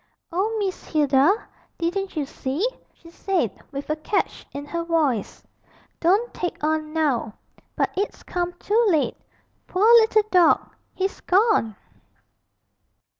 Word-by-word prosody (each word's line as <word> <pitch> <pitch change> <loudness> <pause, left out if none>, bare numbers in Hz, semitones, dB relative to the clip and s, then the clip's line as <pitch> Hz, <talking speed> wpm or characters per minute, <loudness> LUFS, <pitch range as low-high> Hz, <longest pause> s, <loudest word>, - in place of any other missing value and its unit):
'Oh, 410 +6 0
Miss 390 -3 -2
Hilda, 285 +1 +3 0.5
didn't 375 +3 -2
you 300 -3 -1
see?' 275 - -2 0.2
she 335 - -17
said, 350 - -1 0.2
with 280 0 -6
a - - +1
catch 395 +6 -2
in 285 +1 -6
her 335 +3 -3
voice. 305 - 0 0.6
'Don't 400 +8 +2
take 350 -4 -4
on, 310 0 0
now; 285 -9 0 0.4
but - - 0
it's 400 +2 -3
come 355 0 -2
too 420 +6 +1
late 315 -5 +1 0.5
poor 380 +3 +1
little 440 -1 +4
dog, 355 -3 +4 0.2
he's 385 +1 -2
gone!' 380 - +2
340 Hz, 125 wpm, -23 LUFS, 300-390 Hz, 0.6 s, little